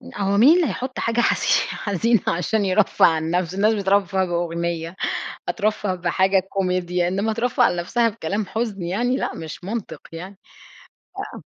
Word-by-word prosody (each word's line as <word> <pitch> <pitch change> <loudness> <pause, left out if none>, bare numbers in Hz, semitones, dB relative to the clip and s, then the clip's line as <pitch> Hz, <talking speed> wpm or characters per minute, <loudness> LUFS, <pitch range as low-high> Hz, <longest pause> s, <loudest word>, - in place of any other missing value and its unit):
هو 200 0 0
مين 280 +10 +7
اللي 345 -5 +3
هيحط 255 +5 -4
حاجة 230 +1 +1
حزي - - +1 0.2
حزينة 215 +2 0
عشان 200 +5 0
يرفّه 190 +1 +3
عن 160 0 +1
نَفسه؟ 180 0 -1
الناس 210 +3 +3
بترفّه 195 -2 +1
بأغنية، 170 -1 -3 0.5
هترفّه 210 -2 0
بحاجة 190 +2 +2
كوميديا، 180 -2 -1
إنما 200 +4 0
ترفّه 235 +2 0
عن - - +2
نَفسها 230 +7 +1
بكلام 205 0 -3
حزن 220 -2 -3
يعني 235 +9 0
لأ، - - -3
مش 160 +2 -8
منطق 195 -7 -5
يعني 185 +4 -8 1.0
آآ - - -10
195 Hz, 150 wpm, -22 LUFS, 175-220 Hz, 1.0 s, مين